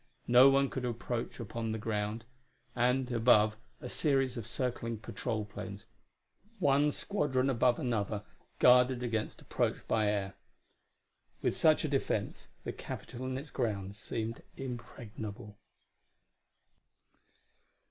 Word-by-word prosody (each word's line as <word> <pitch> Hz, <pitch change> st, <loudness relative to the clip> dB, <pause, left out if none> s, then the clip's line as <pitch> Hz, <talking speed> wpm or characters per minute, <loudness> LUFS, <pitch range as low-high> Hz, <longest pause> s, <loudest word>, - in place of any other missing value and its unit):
No 125 Hz, +3 st, +8 dB
one 135 Hz, 0 st, +3 dB
could 130 Hz, -, -3 dB
approach 120 Hz, 0 st, -3 dB
upon 115 Hz, 0 st, -3 dB
the -, -, -2 dB
ground; 105 Hz, +1 st, -2 dB, 0.5 s
and, 125 Hz, +1 st, +2 dB
above, 110 Hz, -2 st, +5 dB, 0.2 s
a -, -, -7 dB
series 135 Hz, -2 st, +1 dB
of 115 Hz, -3 st, -5 dB
circling 115 Hz, -1 st, -2 dB
patrol 110 Hz, 0 st, -3 dB
planes, 105 Hz, -, -8 dB, 0.7 s
one 145 Hz, -4 st, +3 dB
squadron 140 Hz, -8 st, 0 dB
above 125 Hz, 0 st, +3 dB
another, 105 Hz, -4 st, -1 dB, 0.3 s
guarded 125 Hz, 0 st, +5 dB
against 115 Hz, -3 st, -2 dB
approach -, -, -1 dB
by 110 Hz, -1 st, +2 dB
air. 100 Hz, -2 st, -1 dB, 1.1 s
With -, -, +1 dB
such -, -, +4 dB
a -, -, +1 dB
defense -, -, -1 dB, 0.2 s
the -, -, -4 dB
Capitol 130 Hz, +2 st, -6 dB
and 130 Hz, 0 st, -2 dB
its 140 Hz, +2 st, -8 dB
grounds 100 Hz, -5 st, -2 dB
seemed 115 Hz, 0 st, -4 dB, 0.2 s
impregnable. 115 Hz, -4 st, -7 dB
120 Hz, 115 wpm, -32 LUFS, 110-130 Hz, 1.1 s, No